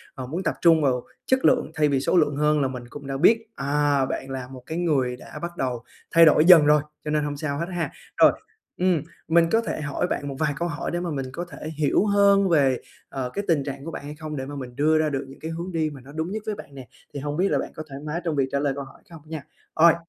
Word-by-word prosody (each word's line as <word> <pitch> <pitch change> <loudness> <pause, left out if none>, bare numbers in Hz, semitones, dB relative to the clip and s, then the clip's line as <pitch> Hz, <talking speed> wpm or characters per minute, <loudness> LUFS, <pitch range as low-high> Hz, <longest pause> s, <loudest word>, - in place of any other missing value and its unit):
ờ, 130 -2 -5
muốn 170 +7 -3
tập - - 0
trung 165 -2 +6
vào 125 -3 +1 0.2
chất 260 0 +2
lượng 245 -11 +3
thay 150 -2 +2
vì 135 -2 +2
số 175 - +1
lượng 150 -3 +3
hơn 150 0 +2
là 135 - +2
mình 125 -2 -6
cũng 140 -1 -9
đã 135 0 -3
biết, 225 +8 +4
à, 140 -1 +1
bạn 135 +1 -4
là 130 -2 -5
một 130 -2 -10
cái 160 - -4
người 135 -8 +1
đã - - -10
bắt 170 0 -5
đầu 125 -3 -2 0.3
thay 165 0 +7
đổi 155 +1 +5
dần 170 -5 +9
rồi, 150 0 +5 0.2
cho 150 - -2
nên 150 -1 +1
hông 145 -1 -3
sao 145 -2 -3
hết 170 - -1
ha. 170 - -2 0.3
Rồi, - - +7 0.5
ừm, 180 -4 +2 0.3
mình 165 0 +4
có 225 +1 +4
thể 185 - -4
hỏi 150 +4 -1
bạn 145 - -3
một 135 - -4
vài 150 -2 +1
câu 175 - -1
hỏi 165 - -4
để 175 - -1
mà 175 -2 -3
mình 135 -2 -3
có 175 +1 -4
thể 155 - -7
hiểu 155 +7 +2
hơn 200 -1 +4
về 135 -6 +3 0.3
ờ 130 -2 -3
cái 200 - -2
tình 155 -5 +2
trạng 140 +1 -6
của 165 - -5
bạn - - -7
hay 150 +1 -7
không? 155 -1 -6
Để 130 -1 -4
mà 145 +1 -7
mình 125 -3 -7
đưa 155 +2 +3
ra 155 -1 +2
được 135 -1 -3
những 135 - -13
cái 160 +1 -5
hướng 170 +3 -5
đi 160 -2 0
mà 140 -3 -11
nó 135 +3 -13
đúng 160 +4 -3
nhất 215 0 -4
với 215 -1 -2
bạn 140 - -12
nè, 130 -3 -9 0.3
thì 140 - -4
hông 145 +2 -4
biết 190 +2 +3
là - - +2
bạn - - -5
có 155 - -6
thoải 135 +1 -8
mái 165 +4 -3
trong 165 -3 -1
việc 135 -1 +2
trả 140 - 0
lời 140 -1 0
câu 140 - -4
hỏi 135 - -15
không 165 -3 -12
nha? 155 -3 -5 0.3
Ôi. 165 +1 +6
150 Hz, 290 wpm, -24 LUFS, 140-170 Hz, 0.5 s, dần